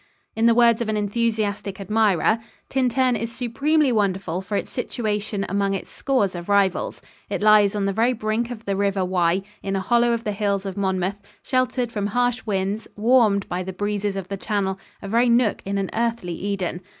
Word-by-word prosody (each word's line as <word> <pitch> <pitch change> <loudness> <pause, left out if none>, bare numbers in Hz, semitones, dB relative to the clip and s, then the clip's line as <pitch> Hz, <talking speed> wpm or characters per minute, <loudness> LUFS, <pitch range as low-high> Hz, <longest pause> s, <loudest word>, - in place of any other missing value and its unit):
In 225 +1 +3
the 230 - +5
words 235 -1 +5
of 225 - -1
an 215 - 0
enthusiastic 210 -2 -1
admirer, 215 0 +2 0.3
"Tintern 255 -1 +2
is 230 +1 -3
supremely 275 +5 +1
wonderful 190 -5 0
for 190 +2 -4
its - - -2
situation 210 -5 -2
among 200 0 0
its 195 - -6
scores 255 -9 0
of 175 +1 -7
rivals. 200 -2 +1 0.3
It - - -2
lies 210 -1 +5
on 205 -1 0
the 195 - 0
very 230 +5 +2
brink 220 +1 -1
of 230 -2 -8
the 200 - -1
River 195 -1 +1
Wye, 180 0 +1 0.2
in 195 0 -2
a - - +1
hollow 235 +5 +2
of 230 -1 -1
the 210 - -1
hills 200 -1 -1
of 195 - -4
Monmouth, 190 0 -1 0.2
sheltered 255 -2 0
from 205 -3 -2
harsh 245 +2 0
winds, 200 +1 -1
warmed 215 -3 +3
by 180 +1 -2
the 190 +1 -5
breezes 205 +1 -2
of 195 -2 -4
the 195 - -4
Channel 195 -2 -1 0.2
a - - -5
very 235 +4 +3
nook 235 -2 +3
in 200 +1 -2
an 195 -1 -2
earthly 230 -6 -1
Eden. 190 -1 -3
205 Hz, 195 wpm, -23 LUFS, 195-235 Hz, 0.3 s, the